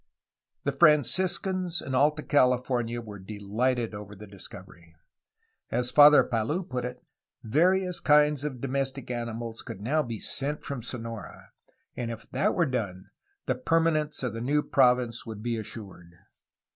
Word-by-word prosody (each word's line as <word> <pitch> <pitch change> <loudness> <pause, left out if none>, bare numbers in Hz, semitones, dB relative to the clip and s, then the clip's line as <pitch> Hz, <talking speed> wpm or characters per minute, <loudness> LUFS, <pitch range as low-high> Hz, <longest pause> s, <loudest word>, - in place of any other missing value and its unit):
The 140 - 0
Franciscans 175 +4 +2
in 135 - -5
Alta 150 +3 +2
California 125 -3 +1
were 105 -3 -9
de 105 +3 -8
lighted 115 +3 -1
over 105 0 -8
the 105 +2 -11
discovery. 95 -4 -13 0.7
As 125 0 0
Father 150 0 +8
Palou 120 - -1
put 125 -6 -4
it, 125 0 -7 0.4
various 180 - +2
kinds 150 -1 +4
of 130 -5 -4
domestic 135 -1 -2
animals 115 -1 -5
could - - -8
now 145 +8 +1
be 115 -5 -5
sent 145 +2 -2
from 140 -4 -5
Sonora, 115 -2 -8 0.4
and 120 -2 -3
if 115 -1 -7
that 210 - +1
were 170 - +3
done 105 - -4 0.3
the - - +1
permanence 155 +2 0
of 125 -4 -2
the 115 - -5
new 145 +4 +1
province 125 -3 +2
would 110 -1 -7
be 120 -1 -1
assured. 100 -5 -8
125 Hz, 145 wpm, -27 LUFS, 115-150 Hz, 0.7 s, Father